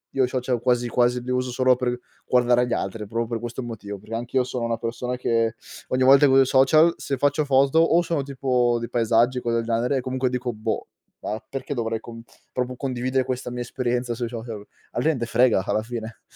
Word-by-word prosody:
io 130 - +3
social 125 -2 -2
quasi, 120 -1 +1
quasi 125 +1 +2
li 125 - -8
uso 125 0 -1
solo 130 +1 +3
per 125 0 -2 0.3
guardare 125 0 +3
gli - - -6
altri, 110 -2 -3
proprio 115 +2 -2
questo 120 +2 -5
motivo. 105 -4 -7
Perché, 110 +3 -7
anch'io 125 +2 0
sono 125 -1 -4
una 115 -1 -1
persona 120 +2 -4
che 115 -2 0 0.3
ogni 130 0 +1
volta 135 +2 +7
che - - +3
uso 135 - +6
i - - -2
social 155 +6 +5
se 135 - -3
faccio 145 +3 +2
foto, 140 +3 +3
o 165 +1 +4
sono 165 -4 -1
tipo 125 -3 +1
di 115 - -4
paesaggi 120 +2 +2
o - - -10
cose 115 -1 0
del 115 - -1
genere 120 +4 0
e - - -1
comunque 130 0 -1
dico: 125 -1 -3
“Boh, 110 +1 -3 0.3
ma 110 +1 -3
perché 135 +2 -4
dovrei, 115 -2 -2
com 115 0 -10 0.3
proprio 125 0 -2
condividere 130 -1 -1
questa 125 -1 -4
mia 125 0 -4
esperienza 120 -1 -2
sui 120 -1 -3
social?” 115 -3 -7 0.3
Alla 120 - -2
gente 140 -6 +1
frega, 115 -4 +3
alla 110 - 0
fine? 115 -1 -7
125 Hz, 215 wpm, -24 LUFS, 115-130 Hz, 0.3 s, volta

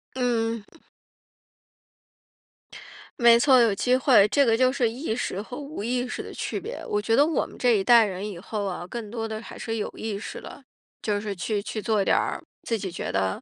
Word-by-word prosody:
嗯。 230 -3 -1 2.5
没 235 -1 +7
错， 260 -1 +6
有 230 -3 +4
机 250 +6 +2
会， 255 -6 +5
这 280 +6 +3
个 225 -2 +3
就 255 +1 +3
是 245 -4 +1
意 235 0 -3
识 200 -5 -3
和 245 +4 -8
无 290 -5 -7
意 245 +3 -1
识 245 - -5
的 - - -9
区 - - -3
别。 455 +6 -7
我 210 - 0
觉 225 +2 +1
得 285 - +5
我 320 0 0
们 - - -14
这 245 -3 +3
一 195 - 0
代 235 +1 +7
人 195 0 -4
以 190 - -7
后 205 +3 -4
哦， 180 -2 -4
更 225 -2 -6
多 225 0 -4
地 220 -1 -5
还 - - -10
是 225 -1 -4
有 210 - -2
意 215 -2 -4
识 - - -7
地， - - -11 0.4
就 205 -1 -1
是 210 -1 -4
去 200 +3 -2
去 215 0 -4
做 215 -3 +1
点 - - +3
儿 - - -2 0.2
自 230 - -1
己 190 -3 -5
觉 170 - -5
得 95 -1 -1
225 Hz, 230 characters per minute, -25 LUFS, 205-245 Hz, 2.5 s, 没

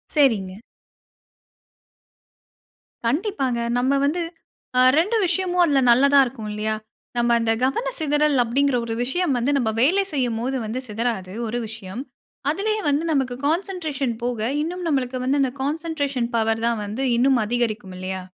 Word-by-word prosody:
சரிங்க. 210 -10 +2 2.5
கண்டிப்பாங்க. 275 - 0 0.2
நம்ம 255 +2 +1
வந்து 320 +5 0 0.6
அ - - +7 0.2
2 415 +8 +1
விஷயமும் 360 0 +1
அதில 285 -4 +3
நல்லதா 280 +4 +5
இருக்கும் 235 -4 -6
இல்லயா, 215 +1 -1 0.4
நம்ம 240 0 +2
அந்த 230 -1 +1
கவன 460 - 0
சிதறல் 295 -3 +2
அப்பிடிங்கிற 265 +2 +1
ஒரு 225 - -3
விஷயம் 290 +1 0
வந்து 245 +4 +1
நம்ம 240 -5 +1
வேலை 370 +10 +4
செய்யும்போது 250 -1 -1
வந்து 230 +4 -3
சிதறாது 215 -4 -2
ஒரு 240 +2 -2
விஷயம். 220 +1 -7 0.5
அதிலேயே 430 +5 -1
வந்து 290 +2 +1
நமக்கு 265 -4 0
கான்சென்ட்ரேஷன் 315 - -1
போக 235 -2 -1
இன்னும் 350 +2 -4
நம்மளுக்கு 260 -3 0
வந்து 275 +2 +2
அந்த 255 - 0
கான்சென்ட்ரேஷன் 285 -5 -2
பவர் 225 0 +1
தான் 230 -2 0
வந்து 220 +7 -3
இன்னும் 260 +1 +4
அதிகரிக்கும் 215 -5 -2
இல்லையா! 185 0 -4
260 Hz, 135 wpm, -23 LUFS, 230-300 Hz, 2.5 s, அ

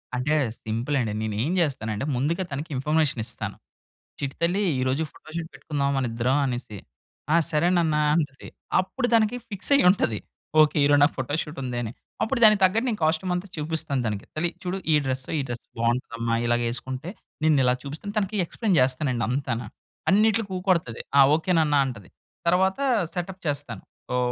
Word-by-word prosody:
అంటే 125 +5 0 0.3
సింపుల్ 115 +6 -1
అండి. 110 -4 -1
నేను 110 -1 -2
ఏం 155 - -1
చేస్తానంటే 115 -8 -1
ముందుగా 165 +9 0
తనకి 145 +5 -4
ఇన్ఫర్మేషన్ 150 -2 +1
ఇస్తాను. - - -5 0.6
చిట్టి 140 -1 -3
తల్లి 175 +4 +2 0.2
ఈరోజు 130 +5 +1
ఫోటోషూట్ 160 +1 -7
పెట్టుకుందాం 140 -2 -2
మన 135 - +1
ఇద్దరం 120 +4 +1
అనేసి. 120 -5 -4 0.6
ఆ! - - +6 0.2
సరే 155 +2 +2
నాన్న 160 -3 +2 0.2
అంటది. 145 -5 -2 0.3
అప్పుడు 240 +7 -1
తనకి 225 +1 +4
ఫిక్స్ 200 +7 -4
అయ్యి 280 - +4
ఉంటది. 115 - +1 0.4
ఓకే, 155 +1 +3
ఈరోజు 145 0 +5
నాకు 145 - +3
ఫోటోషూట్ 150 +4 -3
ఉందని. 120 -3 -3 0.3
అప్పుడు 245 +3 0
దానికి 215 -2 +8
తగ్గట్టు 225 +7 +3
నేను 220 - -2
కాస్ట్యూమ్ 160 +3 +1
అంతా 180 +3 -4
చూపిస్తాను, 150 -3 -1
తనకి. 105 -2 -3
తల్లి 170 +3 0
చూడు 180 +1 -2 0.2
ఈ - - +6
డ్రెసే 130 +2 -2
ఈ - - +1
డ్రెస్ 120 -1 -5 0.2
బాగుంటుందమ్మా. 115 -1 0
ఇలాగేసుకుంటే, 120 +5 -1 0.3
నిన్ను 155 -3 +4
ఇలా 125 0 +4
చూపిస్తాను. 155 +9 -6
తనకి 210 0 0
ఎక్స్‌ప్లయిన్ 205 +2 0
చేస్తానండి 130 -2 +1
అంతాన. 125 -2 -1 0.5
అన్నిట్లోకి 215 +1 +3
ఊకొడతది. 180 - 0 0.2
ఆ! - - +10
ఓకే 165 +3 -1
నాన్న 150 -2 +2
అంటుంది. 110 -8 -7 0.4
తర్వాత 190 +4 +3 0.3
సెటప్ 185 +1 -5
చేస్తాను. 145 -1 -3 0.3
వో - - +2
150 Hz, 160 wpm, -25 LUFS, 125-180 Hz, 0.6 s, ఆ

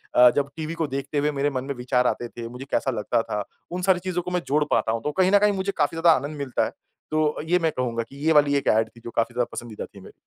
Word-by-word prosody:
अ, 125 0 +9
जब 140 -1 +1
टीवी 160 0 -4
को 165 -2 -1
देखते 140 +2 -4
हुए 145 +1 +2
मेरे 145 0 0
मन 130 -2 -3
में 140 +1 -4
विचार 125 0 +1
आते 120 - -1
थे, 115 0 -7
मुझे 125 +2 -8
कैसा 135 - +1
लगता 115 0 0
था, 105 -1 -3 0.3
उन 180 - -3
सारी 180 -1 +3
चीज़ों 180 -1 -2
को 180 - -6
मैं 180 -1 0
जोड़ 150 +2 +3
पाता 110 - +2
हूँ, 115 0 -2
तो 150 - -1
कहीं 185 - +4
न 205 - +7
कहीं 210 0 +3
मुझे 195 0 -1
काफ़ी 145 +3 +1
ज़्यादा 170 0 +7
आनंद 150 +1 -6
मिलता 140 -3 0
है। - - -4 0.4
तो 155 -1 +1
ये 180 +2 +3
मैं 165 -2 +1
कहूँगा 120 -3 -2
कि 125 +4 -16
ये 160 - +4
वाली 145 -1 +5
एक - - -3
एड 110 +1 +3
थी 115 - -18
जो - - -4
काफ़ी 115 +1 +1
ज़्यादा 120 0 0
पसंदीदा 115 -3 -6
थी 100 - -15
मेरी। - - -13
140 Hz, 290 wpm, -24 LUFS, 120-165 Hz, 0.4 s, अ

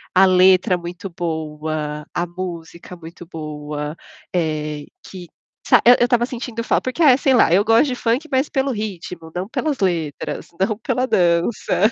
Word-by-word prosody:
a 190 +1 +7
letra 185 +1 +4
muito 175 +2 -7
boa, 155 -3 -4
a 175 - -1
música 175 -1 -8
muito 170 0 -12
boa, 150 -1 -5 0.4
eh, 155 -3 -2 0.2
que 180 -2 -10 0.4
sabe - - +5
que - - +6
eu - - +8
eu - - +6
estava 240 -1 +2
sentindo 240 -2 -5
falta, - - +1
porque 335 - -5
é 265 -5 +7
sei 270 -1 +2
lá, 240 - +4
eu 195 +3 +5
gosto 225 +6 +4
de 255 - -2
funk, 245 +6 -1
mas 265 +2 +1
pelo 270 -1 0
ritmo, 180 -7 -6
não 180 +2 -3
pelas 295 +2 -2
letras, 165 -6 -2
não 205 +2 0
pela 250 +4 -1
dança. 185 +3 +2
180 Hz, 170 wpm, -20 LUFS, 160-230 Hz, 0.4 s, eu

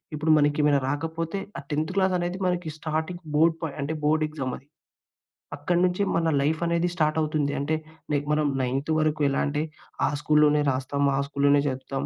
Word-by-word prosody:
ఇప్పుడు 155 +1 +1
మనకి 150 0 +2
ఏమైనా 145 -1 +4
రాకపోతే 165 +5 -3 0.2
ఆ - - -4
10థ్ 155 +4 -1
క్లాస్‌ 190 -1 +2
అనేది 175 +1 -2
మనకి 180 -2 -1
స్టార్టింగ్ 160 +3 -3
బోర్డ్ 160 +2 +4
పాయింట్ 155 -2 -5
అంటే 150 +3 -2
బోర్డ్ 155 +1 +2
ఎక్సామది. 135 -3 -5 0.9
అక్కడినుంచి 180 +5 +1
మన 165 -1 +2
లైఫ్ 155 +4 0
అనేది 170 +1 +1
స్టార్ట్ 155 -2 +1
అవుతుంది. 150 -2 0
అంటే 150 +3 0 0.4
నే 145 - +3
మనం 150 -1 +2
నైన్త్ 135 +4 -1
వరకు 155 -1 0
ఎలా 135 - 0
అంటే, 145 +1 -1 0.4
ఆ - - +1
స్కూల్‌లోనే 150 -1 +4
రాస్తాం. 135 +2 -2
ఆ - - +1
స్కూల్‌లోనే 140 0 +3
చదువుతాం. 130 +1 -3
155 Hz, 170 wpm, -25 LUFS, 145-165 Hz, 0.9 s, ఏమైనా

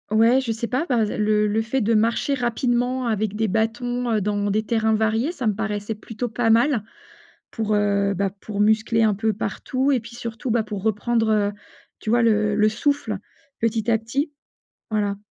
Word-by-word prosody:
Ouais, 230 +5 +4
je 245 -3 -2
sais 230 +1 -3
pas, 255 +7 -1
bah, 235 -4 +3
le 210 0 +1
le 215 +2 +1
fait 225 +4 -1
de 230 -1 +1
marcher 230 +5 +2
rapidement 245 0 0
avec 215 -2 -1
des 220 +1 0
bâtons, 240 +3 -1
heu, 220 - +2
dans 205 0 -1
des 215 +2 +1
terrains 220 -1 +1
variés, 220 +6 +1
ça 270 -10 -3
me 215 - +2
paraissait 210 0 -3
plutôt 225 +3 -5
pas 225 0 0
mal, 235 0 +3 0.7
pour, 215 -2 -1
heu, 200 -1 +2
bah, 195 +1 0
pour 205 -2 -5
muscler 220 +2 +3
un 215 -2 +3
peu 220 +2 0
partout 260 +5 -2
et 270 - +3
puis 230 +1 -11
surtout, 235 +1 -5
bah, 235 -1 +2
pour 210 -3 -6
reprendre, 225 +1 +1
heu, 205 -1 +2 0.5
tu 215 - -4
vois, 240 +1 +4
le 215 -2 +2
le 215 +1 +4
souffle 285 +7 -1 0.4
petit 225 0 0
à 225 - +4
petit, 275 +7 -2 0.6
voilà. 205 -2 0
220 Hz, 190 wpm, -23 LUFS, 210-240 Hz, 0.7 s, Ouais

